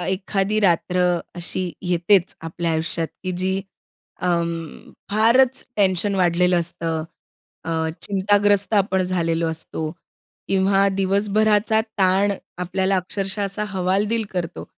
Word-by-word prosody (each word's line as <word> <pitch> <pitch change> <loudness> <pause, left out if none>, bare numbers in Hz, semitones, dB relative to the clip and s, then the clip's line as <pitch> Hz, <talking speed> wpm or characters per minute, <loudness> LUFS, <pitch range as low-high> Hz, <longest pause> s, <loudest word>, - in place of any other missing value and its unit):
ए - - -3
एखादी 195 +2 -1
रात्र 180 -1 +2 0.4
अशी 175 +2 -3 0.2
येतेच 175 +1 +2
आपल्या 170 +1 -2
आयुष्यात, 160 0 -1 0.2
की 185 - -1
जी 190 +1 0 0.6
अं, 170 -2 -2 0.2
फारच 245 +5 +3
टेन्शन 195 0 +2
वाढलेलं 180 -1 +3
असतं, 165 -1 -3 0.6
अ, - - -7 0.3
चिंताग्रस्त 205 +1 +2
आपण 190 -2 +2
झालेलो 165 -2 0
असतो 160 -1 -5 0.6
किंवा 195 +1 +3
दिवसभराचा 210 +2 +2 0.2
ताण 195 +2 +3 0.3
आपल्याला 190 +2 0
अक्षरशः 195 +2 -2
असा 200 +2 -2
हवालदिल 200 +4 0
करतो. 175 -3 -4
190 Hz, 110 wpm, -22 LUFS, 175-205 Hz, 0.6 s, फारच